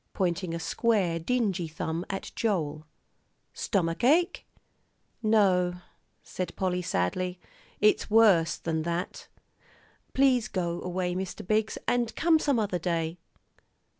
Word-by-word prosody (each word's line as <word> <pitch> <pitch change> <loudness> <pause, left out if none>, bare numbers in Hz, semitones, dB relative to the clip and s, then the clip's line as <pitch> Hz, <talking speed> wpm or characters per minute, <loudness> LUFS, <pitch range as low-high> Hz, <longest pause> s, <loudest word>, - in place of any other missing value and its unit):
pointing 180 -2 -1
a - - -3
square, 190 -3 +1
dingy 195 -3 0
thumb 160 +1 -3
at 195 - -5
Joel. 155 -8 -1 0.7
"Stomach 170 -1 -1
ache?" 335 +8 +3 0.7
"No," 190 -5 +3 0.5
said 185 - -5
Polly, 180 -1 -1
sadly, 180 - -1 0.4
"it's 210 0 +3
worse 205 -7 +5
than 160 -1 -2
that. 170 +2 -4 0.9
Please 260 -4 +3
go 175 -4 -2
away, 180 0 -2
Mr. 185 0 -5
Biggs, 215 +2 0
and 240 -2 0
come 325 -2 +4
some 285 -4 +1
other 205 -5 0
day." 165 0 -2
185 Hz, 115 wpm, -28 LUFS, 170-220 Hz, 0.9 s, worse